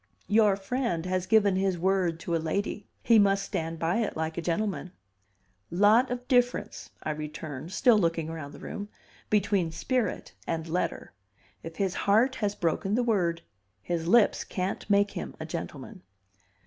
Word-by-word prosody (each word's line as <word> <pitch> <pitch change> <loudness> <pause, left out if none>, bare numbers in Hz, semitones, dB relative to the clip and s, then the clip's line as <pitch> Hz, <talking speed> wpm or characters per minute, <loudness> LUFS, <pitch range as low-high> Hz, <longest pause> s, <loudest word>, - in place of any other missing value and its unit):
"Your 210 -2 +4
friend 195 -4 -2
has 185 0 -1
given 205 -3 +4
his 190 -1 +1
word 180 -2 +1
to 170 - -1
a 165 - 0
lady; 200 +5 -2 0.2
he 230 -2 +6
must 195 -1 +3
stand 165 0 -3
by 165 +4 0
it 225 -7 -1
like 160 0 -2
a 170 - -3
gentleman. 180 +2 -2 0.8
"Lot 210 +8 +4
of 245 0 -4
difference," 245 -1 +1
I 155 - -1
returned, 150 0 -6
still 215 +3 +4
looking 165 -3 0
round 155 -3 -7
the - - -11
room, 205 0 -6 0.4
"between 200 -5 +1
spirit 250 +8 -2
and 160 -1 -2
letter. 175 +3 -2 0.5
If 165 0 -8
his 190 -1 0
heart 225 +9 +3
has 205 -2 -1
broken 190 +4 0
the 245 - +2
word, 175 -8 0 0.4
his 170 -1 -2
lips 230 +3 +4
can't 185 +2 -4
make 200 0 +3
him - - -6
a - - -5
gentleman." - - -7
190 Hz, 160 wpm, -28 LUFS, 165-210 Hz, 0.8 s, he